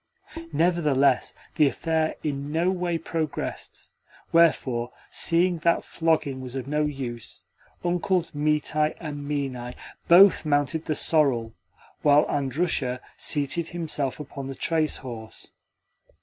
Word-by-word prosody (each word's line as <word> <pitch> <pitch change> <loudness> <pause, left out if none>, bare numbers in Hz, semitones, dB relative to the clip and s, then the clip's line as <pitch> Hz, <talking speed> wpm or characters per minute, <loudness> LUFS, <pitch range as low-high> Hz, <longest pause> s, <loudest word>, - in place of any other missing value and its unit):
Nevertheless, 150 -6 +2 0.2
the 150 - +5
affair 160 +2 -1
in 145 -1 -3
no 170 +4 +2
way 175 -2 -1
progressed; 160 -2 -4 0.4
wherefore, 130 -8 +3 0.2
seeing 175 0 +2
that 170 +1 +2
flogging 155 -5 0
was 130 0 -7
of 130 - -4
no 150 +1 +1
use, 130 -5 -6 0.4
Uncles 175 0 0
Mitai 150 +1 0
and 145 -3 -6
Minai 130 -4 -3 0.3
BOTH 190 +3 +7
mounted 150 +1 0
the 155 - -1
sorrel, 130 -10 +2 0.5
while 145 0 +5
Andrusha 135 -2 0 0.2
seated 150 +3 0
himself 155 -6 -2
upon 140 -2 -7
the 135 - -6
trace 160 +2 0
horse. 115 -4 -8
150 Hz, 115 wpm, -25 LUFS, 135-165 Hz, 0.5 s, BOTH